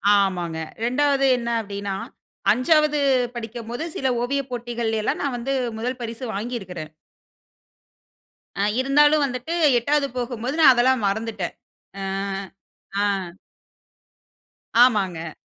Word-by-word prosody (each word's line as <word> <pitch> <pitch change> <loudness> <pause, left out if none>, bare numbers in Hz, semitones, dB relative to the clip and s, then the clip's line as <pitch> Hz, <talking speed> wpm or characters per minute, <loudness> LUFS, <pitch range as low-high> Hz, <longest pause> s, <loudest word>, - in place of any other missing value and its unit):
ஆமாங்க. 175 -5 0 0.2
2 275 +3 +2
என்ன 235 -1 -3
அப்டினா, 200 -1 -4 0.6
5 300 +4 +3 0.4
படிக்கும் 230 0 -6
போது, 245 +7 -3
சில 265 - -1 0.2
ஓவியப் 275 +1 -2
போட்டிகள்ல 235 -2 -2
எல்லாம் - - -1
நான் 270 -3 -1
வந்து 270 +3 -2 0.3
1 250 +2 -3
பரிசு 235 +2 -5
வாங்கி 240 +4 -3
இருக்குறேன். 170 -5 -8 1.7
அ - - +2 0.2
இருந்தாலும் 295 +3 +4
வந்துட்டு, 255 +5 -4 0.2
8 280 +3 +1
போகும்போது 245 +2 -3
நான் 265 -4 +9
அதெல்லாம் 250 -1 +3
மறந்துட்டேன். 210 -2 -2 0.5
அ, - - -4 1.0
அ. 190 -4 -1 1.5
ஆமாங்க. 185 -9 +2
240 Hz, 110 wpm, -23 LUFS, 205-270 Hz, 1.7 s, நான்